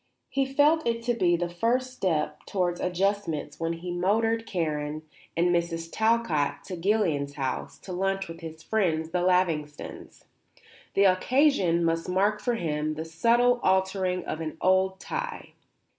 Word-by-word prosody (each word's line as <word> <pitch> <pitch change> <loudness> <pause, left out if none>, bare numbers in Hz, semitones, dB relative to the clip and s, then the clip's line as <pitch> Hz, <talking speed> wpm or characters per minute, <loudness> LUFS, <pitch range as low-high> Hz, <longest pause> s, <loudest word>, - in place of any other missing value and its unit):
He 270 -1 0
felt 300 +3 +3
it 230 0 -1
to 240 +1 +1
be 180 -7 +2
the 175 0 -1
first 240 +9 0
step 150 -9 -1
towards 180 -3 -1
adjustments 180 -5 -1
when 165 0 -1
he 175 +2 -6
motored 225 +6 +1
Karen 155 -4 -2 0.3
and 175 +1 +3
Mrs. 170 -1 -1
Talcott 220 -10 +1
to 185 - -6
Guillian 170 -7 +1
House 135 -2 -4
to 185 - -8
lunch 195 +1 -1
with 165 0 -9
his 160 -1 -9
friends 165 -7 0
the 180 0 0
Lavingtons. 170 -5 -1 0.7
The 200 - +5
occasion 190 - +3
must 165 +1 0
mark 200 +3 +1
for 245 -1 0
him 155 -5 -2
the 160 +1 -5
subtle 235 +9 +3
altering 190 -1 +1
of 155 - -4
an 160 0 -5
old 190 +1 +2
tie. 485 0 -5
180 Hz, 150 wpm, -27 LUFS, 165-215 Hz, 0.7 s, The